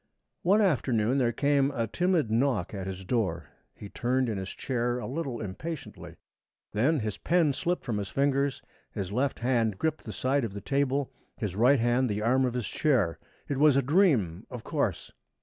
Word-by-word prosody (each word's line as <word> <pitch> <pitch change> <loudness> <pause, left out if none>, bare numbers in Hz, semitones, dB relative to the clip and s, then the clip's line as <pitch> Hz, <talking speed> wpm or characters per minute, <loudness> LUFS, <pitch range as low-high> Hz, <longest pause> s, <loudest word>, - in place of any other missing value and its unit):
One 200 +5 +4
afternoon 130 - +1
there 120 -2 +2
came 140 +2 +2
a 120 -5 -1
timid 170 - 0
knock 115 -5 +1
at 95 -2 -5
his 95 0 -6
door. 90 - -1 0.2
He 105 - -9
turned 125 +4 0
in 105 -3 -2
his 95 0 -5
chair 120 -1 -2
a 125 - -5
little 135 -4 -4
impatiently. 145 - -7 0.6
Then 135 +7 +2
his 105 -1 -4
pen 165 -4 +2
slipped 175 +6 -2
from 110 -5 -1
his 100 -1 -4
fingers. 140 0 0 0.3
His 95 -1 -4
left 130 +5 0
hand 115 -5 +1
gripped 160 +4 -1
the 110 - -5
side 135 +4 0
of 110 -4 -3
the 100 - -5
table, 140 +2 0 0.3
his 100 -5 -3
right 125 +6 +4
hand 120 +2 +2
the 105 0 -2
arm 130 +3 +3
of 125 -1 -2
his 125 -3 -2
chair. 120 - +1 0.3
It 140 - -2
was 150 -1 +5
a 140 - +3
dream, 125 - +2
of 125 -3 -7
course! - - -2
125 Hz, 185 wpm, -28 LUFS, 110-140 Hz, 0.6 s, was